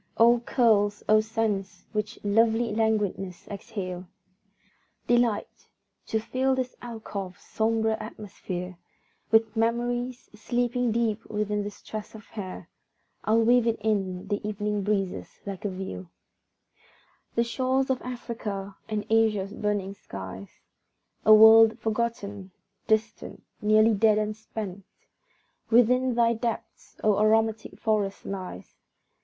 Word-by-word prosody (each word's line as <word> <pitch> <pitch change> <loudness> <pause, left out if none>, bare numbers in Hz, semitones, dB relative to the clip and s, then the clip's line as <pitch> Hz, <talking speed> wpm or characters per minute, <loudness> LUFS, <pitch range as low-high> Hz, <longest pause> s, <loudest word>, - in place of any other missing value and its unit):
O 235 +1 +6
curls, 215 -4 +2
O 215 0 +6
scents 215 -3 -2
which 215 +1 -3
lovely 225 +2 +3
languidness 210 -5 -1
exhale! 190 -4 -6 1.0
Delight! 240 -3 0 0.4
to 220 - 0
fill 260 +4 0
this 255 -1 -3
alcove's 210 -6 -7
sombre 220 0 0
atmosphere 185 -4 -7 0.5
With 220 0 +3
memories, 240 +2 -1
sleeping 240 +2 0
deep 225 -1 0
within 210 -1 -1
this 205 0 -8
tress 215 0 -7
of 215 - -11
hair, 190 -4 -7 0.6
I'll 225 +1 +4
wave 240 +1 +4
it 230 - +1
in 195 -4 -1
the 205 0 -1
evening 210 0 -2
breezes 195 -2 -2
like 195 -1 -6
a - - +1
veil! 140 - -6 1.3
The 235 - +3
shores 260 +2 0
of 255 - -1
Africa, 215 -5 -5
and 210 -1 -2
Asia's 215 -3 +2
burning 205 -2 -2
skies, 95 - -8 0.8
A - - +8
world 220 +1 +8
forgotten, 215 -4 -3 0.4
distant, 220 0 -1 0.2
nearly 215 +1 +5
dead 215 +1 +4
and 215 0 -1
spent, 205 -3 -7 0.9
Within 245 +2 +4
thy 235 -1 +4
depths, 230 0 -5
O 210 -2 +3
aromatic 220 +1 +1
forest! 210 -3 -1
lies. 185 - -7
215 Hz, 115 wpm, -27 LUFS, 200-230 Hz, 1.3 s, A